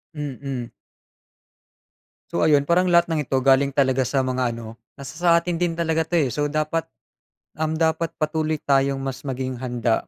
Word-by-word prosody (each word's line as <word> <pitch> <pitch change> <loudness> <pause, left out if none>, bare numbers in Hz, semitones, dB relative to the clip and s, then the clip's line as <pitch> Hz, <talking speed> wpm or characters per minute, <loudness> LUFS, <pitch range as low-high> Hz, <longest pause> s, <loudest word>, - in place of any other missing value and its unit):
Mm. 135 -4 -5 1.6
So - - +1
ayun. 150 -2 +5
Parang 170 +5 +2
lahat 170 0 +5
ng 155 -3 -1
ito 130 0 0
galing 135 +1 +3
talaga 130 -2 +2
sa 135 +2 +1
mga 130 -2 -1
ano, 115 -1 -9 0.2
nasa 140 +3 -10
sa 175 -1 +4
atin 175 0 -2
din 175 0 0
talaga 165 -1 0
'to, 170 - -14
eh. 135 - 0
So 145 +4 -1
dapat, 155 +2 -1 0.7
um, 160 0 0
dapat 160 +1 0
patuloy 155 0 -1
tayong 135 0 +2
mas 135 +1 -5
maging 130 -1 -3
handa, 120 -2 -1
140 Hz, 165 wpm, -23 LUFS, 130-160 Hz, 1.6 s, ayun